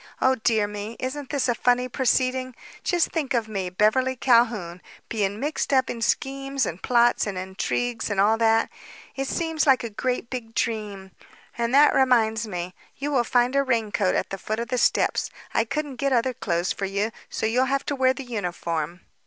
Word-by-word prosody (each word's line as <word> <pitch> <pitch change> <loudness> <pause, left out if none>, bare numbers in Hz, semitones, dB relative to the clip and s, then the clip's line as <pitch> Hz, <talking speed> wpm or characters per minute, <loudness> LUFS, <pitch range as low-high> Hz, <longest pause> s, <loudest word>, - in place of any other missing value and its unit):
"Oh, 260 - +4
dear 220 -3 +1
me! 210 +2 -6
Isn't 265 +1 -4
this 280 -3 0
a 245 - +2
funny 250 +1 +2
proceeding? 255 0 0 0.3
Just 350 -3 +1
think 290 -6 -1
of 230 -2 0
me, 195 -4 -3
Beverly 215 +8 +2
Calhoun, 230 -9 +2 0.3
being 205 -2 -1
mixed 295 +3 -2
up 260 -1 +3
in 230 - -6
schemes 275 +2 0
and 170 +2 -5
plots 240 -2 +3
and 195 -2 -4
intrigues 220 +6 -2
and 205 -2 -1
all 210 +3 +4
that. 225 0 +3 0.4
It 270 0 -2
seems 325 -1 -1
like 265 -2 +5
a 230 - -5
great 250 +2 -2
big 225 -3 -6
dream. 205 -4 -3 0.4
And 235 0 -1
that 295 +1 +6
reminds 230 -4 +3
me: 180 -2 -5 0.2
you 290 +2 -3
will 255 -4 +3
find 245 +2 +2
a 275 - +5
raincoat 220 -7 0
at - - -1
the 195 - -4
foot 215 +3 -3
of 235 - -4
the 250 -1 0
steps. - - +2 0.2
I 225 - +2
couldn't 290 +1 -4
get 275 +2 0
other 255 +1 +2
clothes 175 -5 -1
for 200 - -3
you, 200 +3 -1 0.2
so - - -3
you'll 245 +4 +2
have 275 +1 -1
to 285 - -2
wear 260 -1 +3
the 275 - -6
uniform. 175 -6 -3
235 Hz, 195 wpm, -24 LUFS, 210-260 Hz, 0.4 s, that